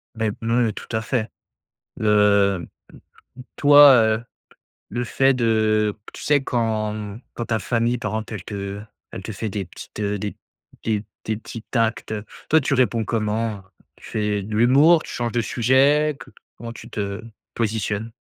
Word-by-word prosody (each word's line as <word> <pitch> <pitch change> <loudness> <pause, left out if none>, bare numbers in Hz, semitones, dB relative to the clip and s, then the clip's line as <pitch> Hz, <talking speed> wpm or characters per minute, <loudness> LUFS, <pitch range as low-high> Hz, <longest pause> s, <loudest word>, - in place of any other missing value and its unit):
Bah, 110 0 -1 0.2
me 115 0 +2
tout - - -9
à 110 - -1
fait. 110 -1 -1 0.7
Le, 100 -2 +3
mmh, - - -13 0.7
toi, 145 -1 +8
heu, 110 -1 +3 0.7
le 120 +3 -2
fait 135 +4 +2
de 110 -3 +2
qu - - -12
tu - - -9
sais, 145 -2 +3
quand, 110 -4 -1
mmh, 105 +1 -7
quand 120 - -4
ta 110 -1 0
famille, 120 +4 0
par 105 -3 -4
exemple, 110 0 -4
elle 95 - -7
te 100 -1 -5 0.3
elle 95 - -7
te 110 - -5
fait 110 +2 -4
des 100 -1 -3
petites, 90 - -11
heu, 105 0 -1
des 105 +1 -3
p - - -19 0.5
des 110 -2 0
p - - -19 0.2
des 110 - -1
petits 115 0 -9
actes, 115 -1 0
heu, 105 -1 -4 0.2
toi, 160 -1 +4
tu 140 - 0
réponds 120 -3 +2
comment, 110 0 -1
heu? 100 - -13 0.4
Tu - - -15
fais 105 -2 -1
de 105 +1 -5
l'humour? 140 +9 +5
Tu - - -9
changes 120 -1 -3
de 120 - +1
sujet? 135 +6 +3
Co - - -13 0.3
comment 115 +1 -7
tu 115 0 -11
te 100 -2 -4 0.3
positionnes? 110 0 -2
110 Hz, 185 wpm, -22 LUFS, 105-120 Hz, 0.7 s, toi